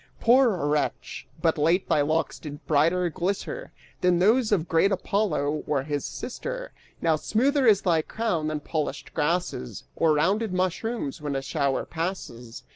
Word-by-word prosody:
Poor 235 - +4
wretch, 150 0 -2 0.2
but 160 -2 +2
late 170 +5 +2
thy 150 - +3
locks 155 +3 0
did 145 -2 -9
brighter 165 +4 +2
glister 195 - -3 0.3
Than 180 -1 +3
those 220 +6 +3
of 175 -5 +1
great 170 +4 +3
Apollo 175 -7 0
or 145 -3 0
his 145 -1 -3
sister! - - -5 0.3
Now, 165 -1 +4
smoother 260 - +2
is 205 -3 +5
thy 170 -4 +3
crown 175 -4 -2
than 155 -1 -2
polished 145 -3 -4
grasses 155 - -2
Or 160 -2 +3
rounded 190 +7 +1
mushrooms 185 - -2
when 145 -2 -3
a 135 - -1
shower 135 0 -1
passes! 160 -9 -5
165 Hz, 150 wpm, -26 LUFS, 150-200 Hz, 0.3 s, is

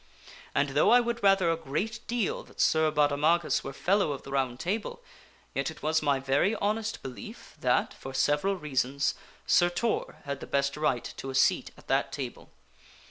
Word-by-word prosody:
And 140 0 +2
though 145 +2 +3
I 245 - +7
would 235 -1 -2
rather 195 -4 +4
a - - +1
great 165 +9 -3
deal 235 -4 -1
that - - -19
Sir 160 0 +4
Baudemagus 150 +3 +2
were 135 - -5
fellow 180 +2 +1
of 135 - -8
the 135 - -10
Round 130 -3 -1
Table, 210 - -3 0.5
yet - - -1
it - - -11
was 160 +1 +2
my 140 -2 +2
very 140 +10 +2
honest 215 +1 -2
belief 130 -2 -9
that, - - +1
for 135 - -9
several 145 +8 +1
reasons, 140 -4 0 0.3
Sir 175 0 +4
Tor 220 +6 -1
had 140 -1 -4
the - - -8
best 140 0 0
right 150 -5 0
to 135 - -6
a 135 - -5
seat 135 - +3
at - - -18
that - - +1
Table. - - -6
155 Hz, 185 wpm, -28 LUFS, 140-195 Hz, 0.5 s, I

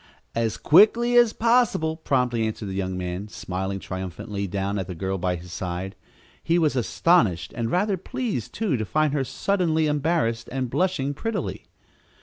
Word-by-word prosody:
"As 115 -2 -1
quickly 230 +8 +5
as 240 -2 +6
possible," 230 -10 +2
promptly 125 -7 0
answered 110 -1 -5
the 95 - -4
young 95 -1 -2
man, 90 +2 -4
smiling 95 -1 -4
triumphantly 95 +2 -5
down 100 +2 -2
at 95 - -4
the 90 - -6
girl 95 +2 -2
by 90 0 0
his 90 +1 -9
side. 90 +1 -4 0.5
He 170 - +2
was 155 -5 +2
astonished, 120 - +2
and 115 -2 -2
rather 195 - +1
pleased, 230 - -4
too, 205 - -1
to 110 - -2
find 155 +5 +1
her 140 -2 +1
suddenly 165 +1 0
embarrassed 150 -6 0
and 130 -2 -2
blushing 175 -7 0
prettily. 220 +8 -4
125 Hz, 160 wpm, -24 LUFS, -, 0.5 s, as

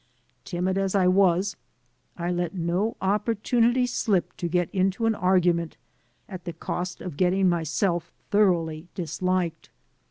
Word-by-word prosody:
Timid 185 +1 -1
as 195 0 0
I 190 -2 +4
was, 185 0 +3 0.6
I 175 0 -2
let 175 +1 -2
no 180 +5 -1
opportunity 230 +4 +2
slip 215 -6 0
to 175 - -2
get 175 0 +1
into 195 +3 +1
an 225 - +3
argument 180 - +1 0.5
at 185 -3 -8
the 170 - -4
cost 180 +2 -4
of 175 -6 -7
getting 185 +2 +3
myself 170 +1 0 0.2
thoroughly 170 -6 +2
disliked. 180 -1 -2
180 Hz, 130 wpm, -25 LUFS, 175-195 Hz, 0.6 s, I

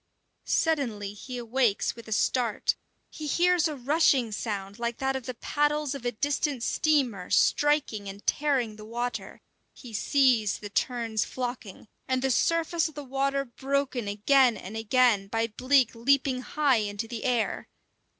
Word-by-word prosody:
Suddenly 235 -11 0
he 250 +5 -8
awakes 240 -2 0
with 230 -1 -12
a - - -9
start. 235 +1 +1 0.4
He 305 - -6
hears 350 +2 +3
a 305 - -4
rushing 270 -3 +2
sound 205 -1 -4
like 235 0 -2
that 270 0 -1
of 260 -3 -5
the 255 - -4
paddles 295 +2 0
of 275 -3 -8
a - - 0
distant 285 +1 -1
steamer 250 -14 +1
striking 290 -9 +2
and 200 +1 -10
tearing 260 -7 0
the 215 - -10
water; 240 +3 -5 0.3
he 245 -4 -12
sees 240 -3 +2
the 205 -1 -9
terns 230 -2 0
flocking, 245 -6 -6 0.2
and 260 0 0
the 265 - +2
surface 330 +4 +1
of 315 - -17
the 295 - -6
water 275 +1 -1
broken 265 -1 -2
again 240 +4 +3
and 195 +4 -8
again 225 -2 +2
by 225 +2 0
bleak 255 +3 +2
leaping 255 +2 +1
high 280 0 +2
into 205 +1 -3
the 230 -1 -6
air. 245 -3 0
250 Hz, 155 wpm, -27 LUFS, 220-280 Hz, 0.4 s, hears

